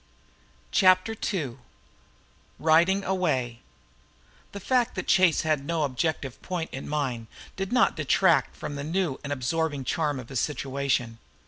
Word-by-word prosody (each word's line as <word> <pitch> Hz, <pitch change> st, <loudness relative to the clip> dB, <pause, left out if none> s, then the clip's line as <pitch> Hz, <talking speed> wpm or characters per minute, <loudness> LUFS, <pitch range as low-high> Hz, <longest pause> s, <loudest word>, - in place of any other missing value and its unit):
CHAPTER 185 Hz, +3 st, +4 dB, 0.2 s
II 140 Hz, -, -3 dB, 1.0 s
RIDING 170 Hz, +5 st, +3 dB
AWAY 140 Hz, -12 st, -1 dB, 0.9 s
The 200 Hz, -, -7 dB
fact 250 Hz, +4 st, +1 dB
that -, -, -3 dB
Chase 185 Hz, -5 st, +4 dB
had 155 Hz, -3 st, 0 dB
no 160 Hz, +1 st, -1 dB
objective 140 Hz, -1 st, -2 dB
point 175 Hz, -3 st, -4 dB
in 135 Hz, -, -6 dB
mind 130 Hz, -6 st, -2 dB, 0.3 s
did 190 Hz, 0 st, -4 dB
not 250 Hz, -1 st, +3 dB
detract 160 Hz, +3 st, +3 dB
from 145 Hz, -, -6 dB
the 140 Hz, -, -4 dB
new 165 Hz, -2 st, -1 dB
and 140 Hz, -, -5 dB
absorbing 145 Hz, +2 st, -1 dB
charm 150 Hz, -1 st, -1 dB
of 120 Hz, -, -10 dB
his 135 Hz, -3 st, -2 dB
situation. 135 Hz, -5 st, -1 dB
155 Hz, 135 wpm, -26 LUFS, 135-185 Hz, 1.0 s, CHAPTER